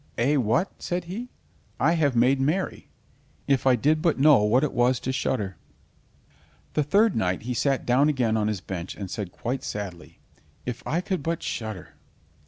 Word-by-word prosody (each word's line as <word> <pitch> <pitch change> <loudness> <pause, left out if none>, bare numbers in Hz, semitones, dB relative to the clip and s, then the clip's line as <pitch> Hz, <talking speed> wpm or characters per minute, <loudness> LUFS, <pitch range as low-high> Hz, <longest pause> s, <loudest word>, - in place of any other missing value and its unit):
"Eh, 135 +6 +2
what?" 125 - +1
said 175 0 -2
he, 210 +9 -6 0.5
"I - - +4
have 150 -6 +2
made 130 +3 +3
merry. 165 +8 -1 0.6
If 135 -1 +2
I 130 - +6
did 150 +6 +2
but 165 -2 +2
know 140 -3 +6
what 110 +6 +3
it 150 - -1
was 125 +1 +2
to 130 - -3
shudder!" 105 -8 -2 1.2
The 150 - +2
third 200 +9 +3
night 90 -3 0
he 125 +2 -3
sat 135 +2 0
down 135 +5 +4
again 125 -6 +1
on 105 -1 +1
his 105 -4 -2
bench 90 -2 -6
and 95 -2 -7
said 100 -5 -4
quite 125 +7 -4
sadly: 100 -4 -6 0.5
"If 125 0 -4
I 170 +3 0
could 185 -2 -2
but 165 +3 -2
shudder." 110 -6 -5
130 Hz, 180 wpm, -25 LUFS, 110-155 Hz, 1.2 s, I